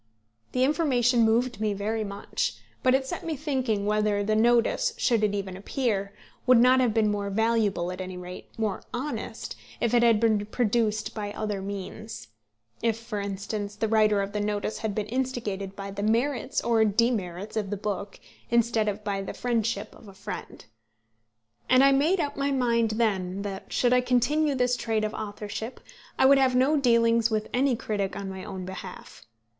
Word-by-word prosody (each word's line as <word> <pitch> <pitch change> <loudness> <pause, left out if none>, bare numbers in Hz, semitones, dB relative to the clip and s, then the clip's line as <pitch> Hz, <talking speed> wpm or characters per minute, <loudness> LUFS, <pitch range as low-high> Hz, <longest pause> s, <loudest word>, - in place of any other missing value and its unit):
The 255 - +2
information 260 -5 +3
moved 230 0 +2
me 215 -1 +1
very 215 +2 -2
much; 200 -1 -3 0.3
but 255 0 +4
it 265 0 0
set - - -5
me 325 -2 -2
thinking 260 -8 -1
whether 210 -1 +1
the 215 +1 +1
notice, 240 - +3
should 235 - +2
it 205 -1 +2
ever 185 - -7
appear, 200 -1 -2 0.4
would 255 -1 +7
not 255 +2 +6
have 250 -3 +3
been 215 -1 +2
more 200 -1 -2
valuable, 210 -4 +1
at 185 - -6
any 185 0 -6
rate 180 0 -9
more 215 -4 -1
honest, 275 +5 -5 0.2
if 235 0 0
it 240 - +5
had 230 -2 +5
been 215 -2 +2
produced 215 -2 0
by 205 -2 -4
other 210 -2 -3
means; 200 - -7 0.5
if 225 -1 +1
for 230 -2 -5
instance 200 +1 -4
the 220 +1 -1
writer 215 -2 +3
of 195 - -5
the 210 - -1
notice 205 +1 -2
had 220 -3 -3
been 215 - -1
instigated 225 -6 -3
by 195 0 -6
the 200 +1 -5
merits 230 +4 0
or 230 -2 +3
demerits 210 -3 0
of 210 -3 -1
the 205 - -2
book 200 0 -4 0.3
instead 235 -2 +2
of 210 +1 -2
by 200 -2 -2
the 195 - -6
friendship 230 -1 -1
of 220 - -15
a 195 - -13
friend. 195 - -8 1.0
And 255 +1 +6
I 275 - +6
made 305 +8 +3
up 290 -3 -1
my 280 0 0
mind 235 -4 +2
then 195 -4 0
that, 195 -2 -6
should 245 0 +2
I 250 - +5
continue 280 +4 +2
this 250 -1 +2
trade 225 -3 -1
of 215 - -2
authorship, 210 +3 -6 0.4
I - - +4
would 275 +1 +7
have 260 -2 +3
no 265 +5 +4
dealings 230 -4 +3
with 215 -1 -1
any 260 0 +2
critic 205 -3 -2
on 195 -1 -5
my 190 -1 -7
own 190 -2 -6
behalf. 190 -9 -9
220 Hz, 185 wpm, -27 LUFS, 205-245 Hz, 1.0 s, would